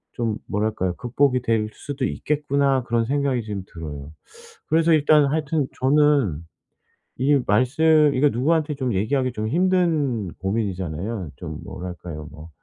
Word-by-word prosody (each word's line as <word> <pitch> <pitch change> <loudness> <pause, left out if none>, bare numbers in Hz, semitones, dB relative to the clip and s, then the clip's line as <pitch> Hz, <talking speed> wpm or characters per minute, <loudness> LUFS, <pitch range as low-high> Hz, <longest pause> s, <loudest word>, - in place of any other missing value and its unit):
좀 115 -2 -1
뭐랄까요? 105 -4 -1
'극복이 125 +3 +1
될 110 -3 0
수도 140 -2 -4
있겠구나.' 140 -3 0
그런 115 -1 0
생각이 140 -1 0
지금 105 -3 -5
들어요. 75 -3 -8 0.6
그래서 165 +1 +3
일단 150 -1 +5
하여튼 150 0 0
저는 135 - +3 0.7
이 140 +2 +3
말씀 145 +7 +4
이거 145 +3 +4
누구한테 150 +4 0
좀 130 -5 -2
얘기하기 130 +6 0
좀 110 -2 -3
힘든 160 - +1
고민이잖아요. 95 -2 -3
좀 - - -7
뭐랄까요? 85 -4 -7
뭐 80 +2 -12
125 Hz, 305 characters per minute, -23 LUFS, 100-145 Hz, 0.7 s, 일단